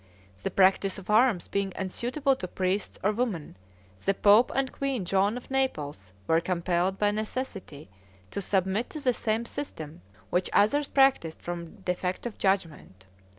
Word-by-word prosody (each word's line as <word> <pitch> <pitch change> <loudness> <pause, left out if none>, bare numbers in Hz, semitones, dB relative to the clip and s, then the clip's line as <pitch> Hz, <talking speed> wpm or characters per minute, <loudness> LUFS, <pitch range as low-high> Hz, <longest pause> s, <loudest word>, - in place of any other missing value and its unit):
The - - -1
practice 195 0 +3
of 195 +1 -6
arms 220 -5 +4
being 200 -1 -1
unsuitable 250 +9 0
to 185 - -5
priests 185 +2 -2
or 205 - +3
women, 210 - -2 0.5
the 195 - +1
pope 210 +5 +5
and 270 -1 0
Queen 270 -8 -2
Joan 195 +5 +2
of 250 - -11
Naples 150 - -2
were 165 0 +3
compelled 180 +1 0
by 205 0 +2
necessity 210 - -5 0.4
to - - -3
submit 190 +4 0
to 310 - -6
the 260 -4 +2
same 225 0 -1
system 160 - -7 0.3
which 180 +1 +1
others 280 +8 +3
practiced 270 - +3
from 170 -1 -6
defect 180 +1 -2
of 240 - -5
judgment. 165 - -1
195 Hz, 150 wpm, -28 LUFS, 180-240 Hz, 0.5 s, pope